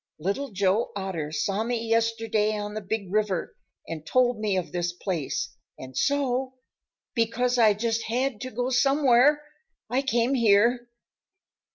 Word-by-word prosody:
Little 200 - -2
Joe 200 +2 +1
Otter 185 -6 -4
saw 195 +7 -1
me 230 -1 -2
yesterday 225 -2 +1
on 205 0 -5
the 215 - -4
Big 200 -1 -4
River 205 -4 -1 0.3
and 160 -2 -6
told 245 +6 +2
me 210 -3 0
of 180 - -3
this 175 0 -2
place, 175 -5 -3 0.2
and 130 0 -10
so, 260 - 0 0.6
because 245 +2 +1
I 215 -3 +5
just 225 +1 -1
had 250 0 -1
to 255 - -4
go 245 +2 -2
somewhere, 275 +2 +4 0.5
I 255 +2 +2
came 245 -1 +1
here." 235 +1 +3
225 Hz, 145 wpm, -26 LUFS, 200-245 Hz, 0.6 s, I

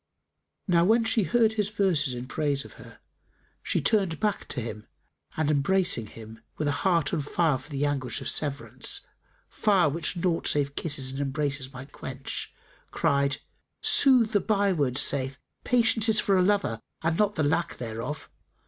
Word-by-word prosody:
Now 170 -2 +4
when 225 +5 +4
she 225 0 +2
heard 225 0 +3
his 210 -2 -1
verses 175 - +1
in 120 +1 -6
praise 140 +1 -1
of - - -12
her, - - -14 0.6
she - - 0
turned 195 -7 +1
back 210 -2 -1
to 135 - -3
him 110 -2 -6 0.5
and 155 -1 +1
embracing 150 - +1
him, 110 +1 -11 0.2
with 155 - -1
a - - +2
heart 170 -6 +1
on 160 - 0
fire 145 -1 +1
for - - -14
the 145 -1 -1
anguish 135 -4 -2
of - - -5
severance, 145 -2 -2 0.5
fire 195 -7 +2
which 165 +5 -2
naught 170 -1 0
save 140 -1 +1
kisses 135 -5 +1
and 135 +1 -4
embraces 140 -1 -2
might 130 +2 -10
quench, 135 +1 -6 0.4
cried, 140 0 +1 0.5
"Sooth 250 -5 +5
the 205 - +3
byword 190 - +1
saith, 135 -1 +1 0.3
Patience 230 -2 +3
is 215 -1 +5
for 195 - +2
a 185 - +4
lover 185 - +1 0.2
and 165 0 +1
not 210 -1 +2
the 155 - 0
lack 165 +4 0
thereof. 115 +5 -5
155 Hz, 165 wpm, -27 LUFS, 135-200 Hz, 0.6 s, Sooth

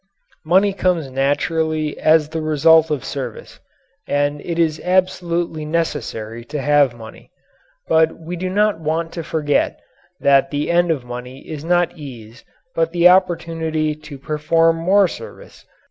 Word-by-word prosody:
Money 190 +5 +3
comes 175 -7 0
naturally 155 +3 0
as 155 -1 +3
the 160 0 -4
result 155 +1 +4
of 150 -5 -2
service. 130 -5 -6 0.5
And 145 0 0
it 170 -1 -4
is 160 -2 +1
absolutely 175 -3 0
necessary 120 -8 -3
to 150 +2 -5
have 145 -3 +3
money. 110 -2 -13 0.6
But 160 0 +3
we 165 +2 -7
do 185 +2 -3
not 205 -1 +1
want 165 +1 -2
to 165 - -5
forget 150 -2 0 0.4
that 140 -1 +4
the 145 +3 -2
end 175 0 +3
of 145 -6 -1
money 125 +2 -8
is 155 -2 -7
not 175 +1 +1
ease 120 -7 -11 0.3
but 165 0 0
the 175 0 +6
opportunity 165 -4 +1
to 155 -1 -11
perform 165 +3 +1
more 190 +4 +3
service. - - -11
160 Hz, 145 wpm, -19 LUFS, 145-170 Hz, 0.6 s, the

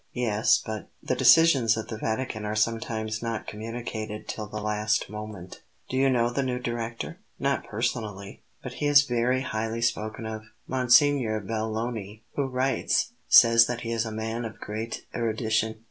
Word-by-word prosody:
"Yes; 115 -2 +3
but 110 -3 -5
The - - 0
decisions 135 -9 +5
of 110 - -4
the 110 - -4
Vatican 110 -1 -2
are 105 0 -2
sometimes 110 0 -1
not 115 -2 -3
communicated 110 -1 -6
till 105 -1 -5
the 105 +2 -5
last 105 -1 0
moment." 105 -4 -8 0.3
"Do - - -3
you 135 +1 +3
know 120 -2 +2
the 140 - 0
new 130 -2 -1
Director?" 120 +6 -4 0.2
"Not 140 +1 -1
personally; 110 -3 -3 0.2
but - - -6
he 145 - -1
is 145 -1 +7
very 125 0 +1
highly 115 -3 -3
spoken 110 -1 -1
of. 110 0 -6 0.2
Monsignor 125 -2 +3
Belloni, 110 0 -4
who 140 -2 -1
writes, 130 +1 0 0.2
says 115 0 +8
that 120 -1 -3
he 115 - -4
is 115 -1 0
a 110 - -5
man 110 +2 -3
of 110 -1 -7
great 110 +2 -5
erudition." 110 -1 -1
115 Hz, 160 wpm, -27 LUFS, 110-120 Hz, 0.3 s, says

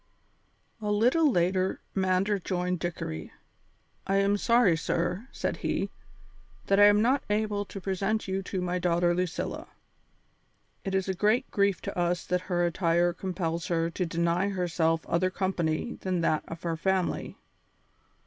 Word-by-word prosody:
A 210 - -2
little 250 +10 +4
later 185 0 +1
Mander 190 +2 +1
joined 180 -1 -2
Dickory. 80 - -4 0.8
"I 195 - +1
am 200 +1 +3
sorry, 230 -4 +4
sir," 180 +7 -2
said - - -3
he, - - -2 0.7
"that 195 0 +3
I 205 - +9
am 205 +1 +5
not 260 +3 +3
able 210 -1 0
to 195 - -8
present 195 +3 -1
you 190 0 -1
to 190 0 -4
my 180 0 -1
daughter 175 0 +2
Lucilla. 180 -1 -3 1.2
It 195 0 -2
is 190 0 0
a 190 - 0
great 215 +7 +1
grief 200 -1 +1
to - - -5
us 175 0 0
that 180 0 0
her 175 -1 +2
attire 175 0 +2
compels 170 -2 -3
her 165 -1 0
to 180 - -2
deny 170 +3 +1
herself 165 -4 0
other 185 +2 +1
company 185 0 -2
than 185 -2 -1
that 155 -2 +1
of 165 0 -8
her 165 -1 -1
family. 190 +2 -1
185 Hz, 150 wpm, -28 LUFS, 170-200 Hz, 1.2 s, I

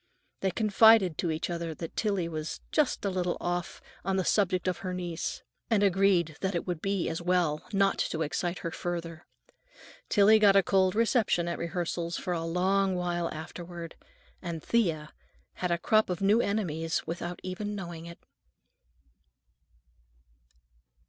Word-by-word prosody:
They 195 - +1
confided 215 -2 +5
to 170 - 0
each 160 0 -2
other 170 -2 -4
that 165 0 -7
Tillie 200 -6 0
was 155 -1 -5
"just 295 -8 +1
a - - +2
little 180 -1 -1
off, 175 0 -3 0.2
on 195 +1 0
the 190 -2 0
subject 185 -3 +1
of 180 - -1
her 185 -1 -4
niece," 175 -2 -4 0.3
and 215 -3 +3
agreed 190 -5 +3
that 190 -1 -1
it 170 - -2
would 175 -3 -3
be 195 -2 -1
as 165 - -3
well 170 -4 +1
not 195 -1 +2
to 160 0 -1
excite 175 +4 -2
her 170 - -2
further. 170 -2 -5 0.8
Tillie 210 +1 +6
got 200 -2 +6
a 195 - +6
cold 190 0 +2
reception 225 -6 +2
at 170 - -3
rehearsals 170 0 -3
for 180 - -3
a 165 -1 -2
long 190 +3 +1
while 175 -1 -1
afterward, 170 +1 -7 0.5
and 170 -3 -5
Thea 165 -10 0 0.4
had 180 - -3
a 170 - +2
crop 215 +5 +2
of 180 - -2
new 205 +4 +4
enemies 165 -7 -1
without 175 +1 -5
even 205 +3 -4
knowing 170 -4 -7
it. 170 - -10
180 Hz, 155 wpm, -29 LUFS, 170-195 Hz, 0.8 s, Tillie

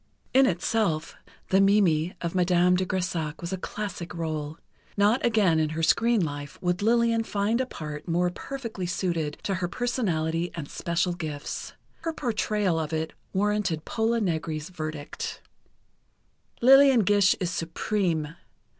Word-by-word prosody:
In 265 +1 +6
itself, 175 -3 0 0.3
the 190 +1 +4
Mimi 185 -5 +3
of 170 -1 -2
Madame 180 0 +3
de 185 0 0
Grésac 170 -5 -2
was 170 +2 -5
a - - +1
classic 185 -2 -5
rôle. 155 -3 -4 0.4
Not 210 +5 +3
again 205 -8 +3
in 155 -1 +1
her 165 - -1
screen 230 +1 +3
life 145 -1 -6
would 180 +2 -1
Lillian 230 +1 +3
find 215 +3 0
a 260 - -2
part 150 -6 -7
more 175 +1 +1
perfectly 230 -5 -5
suited 170 -5 -2
to 195 - -1
her 175 - 0
personality 175 -6 -1
and 160 -4 -5
special 170 +3 -1
gifts. 155 -4 -5 0.2
Her 330 0 -4
portrayal 210 - 0
of 155 -1 -3
it 160 0 -2 0.2
warranted 200 -5 0
Pola 225 +1 0
Negri's 160 -5 -2
verdict: 155 -4 -5 1.2
"Lillian 270 -1 +7
Gish 205 -1 +4
is 180 -2 -1
supreme. 165 -2 -1
180 Hz, 140 wpm, -26 LUFS, 160-210 Hz, 1.2 s, Lillian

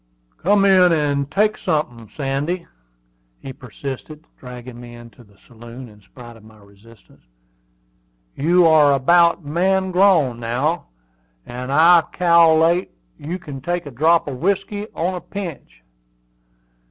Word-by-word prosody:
"Come 200 +2 +2
in 185 -2 +5
and 145 -3 -1
take 210 +5 0
sunthin', 120 -8 -3
Sandy," 145 +7 -3 0.7
he 135 - -10
persisted, 135 +6 -9
dragging 125 -1 -11
me 120 0 -12
into 120 +1 -15
the 100 -2 -25
saloon 120 +2 -12
in 105 -2 -18
spite 120 +3 -14
of 110 - -18
my 110 0 -18
resistance. 105 +3 -21 1.1
"You 175 +4 +3
are 155 -3 +5
about 170 +4 +3
man 190 +5 0
grown 175 -10 +2
now, 130 +9 -2 0.6
and 125 +2 -7
I 165 +4 +6
cal'late 170 0 +3 0.3
you 165 +5 -5
can 145 -7 -10
take 175 +3 -3
a 145 - -9
drop 160 +7 +2
of 130 -3 -6
whiskey, 200 +3 -2
on 175 +3 -2
a 180 - -6
pinch." 165 - -9
150 Hz, 130 wpm, -19 LUFS, 125-175 Hz, 1.1 s, I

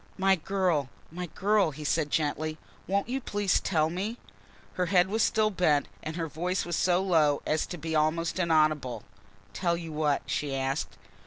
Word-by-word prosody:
"My 195 0 +4
girl, 175 -6 0 0.2
my 180 +2 -5
girl," 200 +2 +2
he 150 +1 -8
said 150 0 0
gently. 155 +1 -1 0.3
"Won't 200 +3 0
you 265 +2 -2
please 205 -4 +1
tell 160 -3 +1
me?" 200 +7 -3 0.6
Her 180 -1 -1
head 180 0 +4
was 220 +2 0
still 215 -1 +2
bent 155 -7 +2
and 160 +1 -5
her 165 -2 -2
voice 180 +4 -2
was 175 -1 -2
so 180 +2 +2
low 155 -6 +3
as 155 - 0
to 175 - -6
be 160 0 -3
almost 165 +3 +1
inaudible. 155 - +2 0.5
"Tell 170 -2 0
you 165 -1 -7
what?" 150 -2 0
she 145 -2 -2
asked. 135 +2 -2
165 Hz, 175 wpm, -28 LUFS, 155-190 Hz, 0.6 s, My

